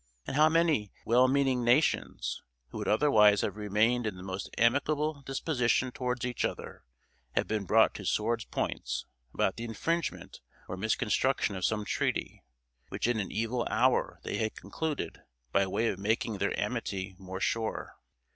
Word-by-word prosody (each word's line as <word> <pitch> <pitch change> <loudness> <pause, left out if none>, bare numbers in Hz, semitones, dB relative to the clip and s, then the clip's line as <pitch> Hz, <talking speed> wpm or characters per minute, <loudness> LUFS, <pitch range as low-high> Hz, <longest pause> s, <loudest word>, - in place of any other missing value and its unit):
and - - -4
how 155 +2 +6
many 160 - +2
well 125 +3 +5
meaning 130 -2 +2
nations, 120 - +1 0.3
who - - -7
would - - -3
otherwise 105 -4 +5
have - - -2
remained 110 +3 +1
in 105 - -3
the 90 - -10
most 95 0 -5
amicable 145 +5 +2
disposition 130 -2 +1
towards 125 -1 -2
each 125 -1 -2
other, - - -4 0.5
have - - +1
been 105 -2 -1
brought 110 +3 +4
to 100 - -8
swords' 115 +4 0
points - - -3 0.3
about 95 - 0
the 115 - -5
infringement 165 +10 -3 0.3
or - - -4
misconstruction 110 +3 +1
of 95 - -5
some 105 +1 0
treaty, - - -2 0.5
which - - -2
in 120 -1 +1
an 100 - -3
evil 115 +2 -1
hour 125 +3 +2
they - - -3
had 110 0 -1
concluded, 160 -2 -4 0.3
by 100 0 +3
way 115 +5 0
of 95 - -2
making 110 0 0
their - - 0
amity 95 0 -3
more 95 0 -6
sure! 110 +2 -2
115 Hz, 160 wpm, -30 LUFS, 105-130 Hz, 0.5 s, how